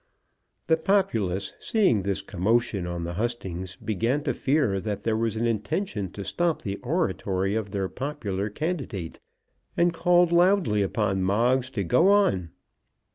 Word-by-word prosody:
The 160 - +3
populace, 110 - 0
seeing 195 - +2
this 95 0 -2
commotion 100 0 0
on 85 -1 -4
the 85 +1 -4
hustings, 95 -4 -4
began 115 +7 -1
to - - 0
fear 135 -9 +1
that 105 0 -4
there 110 0 +1
was 115 0 0
an 115 +2 -1
intention 110 - -2
to 100 - -6
stop 170 -2 -1
the 100 0 -3
oratory 105 - -1
of 110 -2 -2
their 100 -1 -2
popular 110 -7 -3
candidate, 130 - -4 0.6
and 170 0 +3
called 175 +1 +3
loudly 175 - +3
upon 100 -1 0
Moggs 120 +7 +2
to 100 -5 -1
go 165 - +3
on. 195 - +3
110 Hz, 145 wpm, -26 LUFS, 95-155 Hz, 0.6 s, The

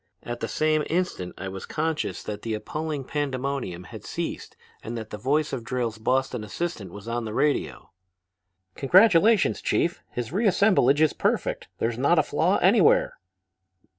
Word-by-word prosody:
At 120 0 -5
the 115 - -3
same 155 +2 +1
instant 170 - -2
I 95 - -5
was 95 0 -7
conscious 155 - -2
that 105 -1 -6
the 115 -1 -2
appalling 150 +5 -4
pandemonium 135 - -3
had - - -10
ceased - - -5 0.2
and 115 +1 -5
that 110 -1 -7
the 105 - -5
voice 145 +6 0
of 125 -4 -3
Drayle's 115 -2 -3
Boston 125 0 0
assistant 105 - -4
was 100 +3 -10
on 120 0 -2
the 110 0 -5
radio. 135 - -1 0.8
"'Congratulations, 195 +6 +4
Chief! 170 +1 0
His 120 0 -5
reassemblage 190 - +3
is 155 - +4
perfect. - - -1
There's 115 +1 -2
not 140 +6 +3
a 155 - +5
flaw 160 +8 +1
anywhere.' 190 -1 +4
135 Hz, 155 wpm, -25 LUFS, 110-160 Hz, 0.8 s, a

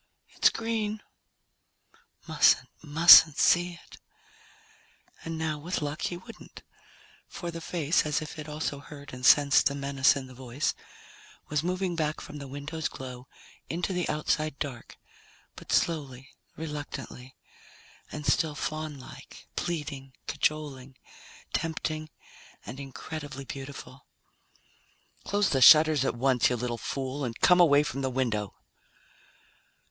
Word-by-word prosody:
"It's - - +4
green." 220 -2 -3 1.2
Mustn't, - - +4
mustn't 160 0 +8
see 175 0 +3
it. - - -15 1.3
And 165 0 -5
now, 155 -2 -2
with 170 +1 -3
luck, 145 +2 -4
he 175 - -2
wouldn't. 225 +5 -13 0.6
For 175 -1 -6
the 165 0 -7
face, 165 -1 0
as 150 -1 0
if 155 0 -8
it 150 0 -7
also 150 -1 -3
heard 145 -1 -12
and 125 0 -9
sensed 145 +2 +6
the 140 - -1
menace 140 -1 +2
in 135 -2 -5
the 130 - -13
voice, 130 +3 -3 0.8
was 150 -1 0
moving 180 +1 -2
back 155 -2 -1
from 150 0 -9
the 140 - -8
window's 145 +4 -4
glow 125 -1 -9 0.4
into 175 +3 -2
the 180 -2 -2
outside 155 -1 -1
dark, 125 -5 -7 0.6
but - - -10
slowly, 140 -5 -1 0.3
reluctantly, 145 -4 -7 0.8
and 150 - -7
still 150 +2 +1
faunlike, 155 -3 -7
pleading, 145 -5 -4
cajoling, 140 -4 -3 0.6
tempting, 155 -1 -3 0.6
and 125 +5 -8
incredibly 140 0 -7
beautiful. 135 0 -9 1.2
"Close 205 0 +1
the 135 - +1
shutters 155 +1 +8
at 135 - -1
once, 130 0 +2
you 125 - 0
little 120 0 -3
fool, 135 +1 -4
and 115 -3 -4
come 180 0 +6
away 150 -4 +6
from 135 -2 -4
the 130 - -1
window!" 115 -6 -2
145 Hz, 130 wpm, -28 LUFS, 135-160 Hz, 1.3 s, mustn't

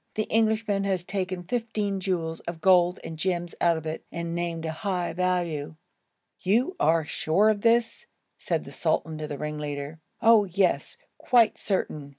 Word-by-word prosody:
The 215 - +1
Englishman 220 -2 +2
has 190 -3 0
taken 185 -1 -3
fifteen 210 -2 -2
jewels 170 -4 -2
of 170 -1 -5
gold 180 0 +4
and 160 -1 -7
gems 175 -1 -1
out 170 -1 +4
of 160 - -7
it,' 155 0 -4
and 170 0 -4
named 170 -1 -3
a 160 - -2
high 180 +1 -2
value. 175 -4 -1 0.6
'You 240 - +1
are 160 0 +3
sure 170 +7 +2
of 205 -1 -3
this?' 230 +1 +2 0.3
said - - -1
the - - -11
sultan 160 -1 -1
to 155 - -4
the 145 - -5
ringleader. 150 0 -5 0.2
'Oh, 225 -2 +6
yes! 185 0 0 0.2
quite 235 -4 +3
certain!' 155 -8 -2
180 Hz, 160 wpm, -26 LUFS, 160-205 Hz, 0.6 s, Oh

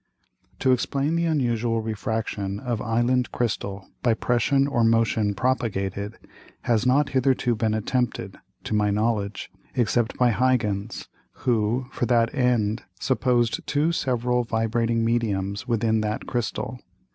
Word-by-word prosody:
] - - -38
To 130 - +4
explain 140 +5 +1
the 170 0 +1
unusual 120 -6 +1
Refraction 110 -2 -3
of 120 -3 -3
Island 120 +2 +1
Crystal 100 -4 -3
by 115 -2 +3
Pression 130 +4 +2
or 130 -5 +1
Motion 115 -2 +2
propagated, 100 -4 -1 0.4
has 120 +1 +1
not 140 +3 +3
hitherto 130 -2 +2
been 110 -1 0
attempted 120 +3 -2 0.2
(to - - -4
my 105 -1 +2
knowledge) 105 -1 -1 0.2
except 120 -1 +1
by 125 -1 +4
Huygens, 110 -4 0 0.4
who 120 +1 +1
for 120 - -1
that 115 -1 +2
end 120 -4 +1 0.2
supposed 120 -2 +1
two 150 +3 +2
several 125 -5 0
vibrating 115 0 0
Mediums 105 -2 -1
within 110 -2 +1
that 105 0 -2
Crystal. 120 +1 -3
115 Hz, 130 wpm, -25 LUFS, 110-125 Hz, 0.4 s, To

